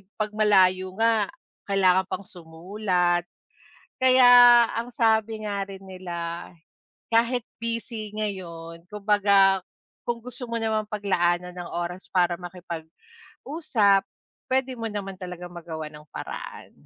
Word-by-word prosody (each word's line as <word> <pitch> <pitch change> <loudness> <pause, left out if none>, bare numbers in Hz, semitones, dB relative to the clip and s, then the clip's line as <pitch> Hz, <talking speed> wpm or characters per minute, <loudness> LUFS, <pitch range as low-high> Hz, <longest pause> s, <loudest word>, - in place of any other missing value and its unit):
pag 215 -1 -2
malayo 185 -3 +3
nga, 225 -2 +2 0.4
kailangan 190 -1 +3
pang 200 - -4
sumulat. 175 +1 -1 0.8
Kaya 245 -2 +8
ang 230 +2 -3
sabi 220 -1 +1
nga 200 -1 -2
rin 195 -1 -10
nila, 175 -2 -6 0.6
kahit 235 +1 +2 0.2
busy 230 -2 -4
ngayon, 170 -5 -6
kumbaga 200 -2 +3 0.5
kung 235 0 0
gusto 250 0 -6
mo 230 - -1
namang 220 -1 -1
paglaanan 180 -4 0
ng 175 -1 -7
oras 175 +2 -4
para 175 -2 +2 0.9
makipag-usap, 215 -11 +1 0.5
pwede 260 0 +1
mo 225 -1 -3
naman 195 -3 -5
talagang 180 -1 -8
magawan 160 -3 -7
ng 150 0 -14
paraan. - - -7
200 Hz, 115 wpm, -25 LUFS, 180-225 Hz, 0.9 s, Kaya